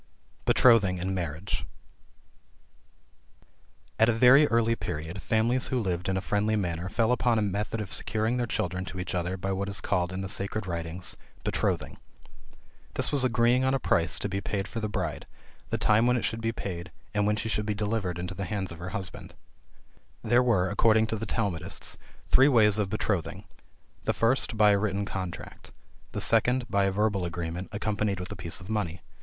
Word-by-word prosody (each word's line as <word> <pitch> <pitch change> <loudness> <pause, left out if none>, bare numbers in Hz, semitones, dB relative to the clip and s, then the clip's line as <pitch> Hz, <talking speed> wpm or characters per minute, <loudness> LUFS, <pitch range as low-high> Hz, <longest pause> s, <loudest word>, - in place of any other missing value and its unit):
BETROTHING 105 -7 +5
AND 95 +2 -2
MARRIAGE. 85 0 -3 2.4
At 110 +1 +5
a - - +5
very 125 +6 +6
early 115 0 +2
period, 80 0 -5
families 115 +3 +1
who 130 - 0
lived 90 -4 -2
in 95 - 0
a - - -1
friendly 105 +1 +1
manner, 90 -3 -2
fell 115 +4 +1
upon 120 -2 +2
a 110 - +2
method 105 +3 -2
of 100 -3 -5
securing 110 +2 0
their 120 -1 -1
children 90 -3 -2
to 95 - -7
each 90 - -4
other 90 +1 -1
by 95 +2 -3
what 100 +1 -2
is 100 - -2
called 90 -3 0
in 95 +1 -4
the 95 - -3
sacred 100 +2 -2
writings 85 0 -3 0.3
Betrothing. - - -1 1.0
This - - -1
was 140 -3 +2
agreeing 120 +1 +3
on 130 +1 +2
a - - 0
price 85 -8 +1
to - - -2
be 100 0 -3
paid 100 0 -2
for 115 - -5
the 105 -1 -2
bride, 90 -8 -3 0.4
the - - -1
time 110 +2 +3
when 125 0 +3
it - - -1
should 115 0 -2
be 115 0 0
paid, 90 -6 -6 0.2
and 105 -1 +1
when 105 - +2
she 110 - -3
should 105 -1 -1
be 105 - 0
delivered 105 -4 -1
into 90 +2 -4
the 95 0 -4
hands 95 -2 -3
of 85 - -9
her 90 +1 -5
husband. 95 -3 -8 0.9
There 120 +2 +4
were, 110 -8 +2
according 110 +1 +4
to - - +1
the 110 +1 -5
Talmudists, 90 -6 -2 0.3
three 135 - +6
ways 110 -6 +4
of 100 -2 0
betrothing. 100 -2 -2 0.6
The - - +2
first 115 0 +1
by 105 -1 +6
a 100 - +3
written 100 -1 -1
contract. 95 -3 -6 0.4
The - - -3
second, 125 0 +3
by 100 -1 +3
a 95 - +1
verbal 100 -1 +1
agreement, 85 +1 -4
accompanied 105 -1 -1
with 90 +2 -6
a - - -4
piece 85 -4 -2
of 95 - -11
money. 95 -6 -2
100 Hz, 195 wpm, -28 LUFS, 90-110 Hz, 2.4 s, very